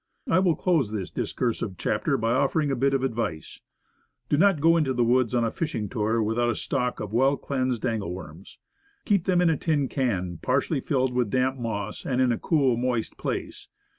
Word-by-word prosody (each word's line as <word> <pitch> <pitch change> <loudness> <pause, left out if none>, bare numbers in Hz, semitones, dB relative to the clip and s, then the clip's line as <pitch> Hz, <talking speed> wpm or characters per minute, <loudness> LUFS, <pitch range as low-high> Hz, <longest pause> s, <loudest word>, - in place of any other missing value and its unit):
I 165 - +3
will 180 -4 +3
close 160 - +1
this 100 -4 -4
discursive 115 -6 -2
chapter - - 0
by 115 +1 0
offering 145 +4 +1
a - - +1
bit 135 +2 +2
of 135 - -1
advice. 110 - -3 0.7
Do - - +3
not 190 +1 +4
go 165 +3 +5
into 150 -5 +1
the 120 - +2
woods 125 0 +2
on 120 - +2
a 115 - 0
fishing 115 - -3
tour 110 +2 0
without 115 +3 +1
a 120 - 0
stock 125 0 -2
of 105 0 -6
well 135 +4 +3
cleansed 130 -3 -2
angle 110 -7 -2
worms. 90 0 -10 0.5
Keep 200 -5 +2
them 180 -2 +3
in 175 -2 +4
a 155 - 0
tin 145 -3 0
can 95 - -2
partly 140 +3 0
filled 130 -2 0
with 125 -3 0
damp 130 +3 0
moss, 110 -3 -4
and 125 -1 -1
in 130 -1 +3
a 115 - -1
cool, 135 -7 +2
moist 120 -2 -1
place. - - -4
125 Hz, 200 wpm, -26 LUFS, 110-140 Hz, 0.7 s, go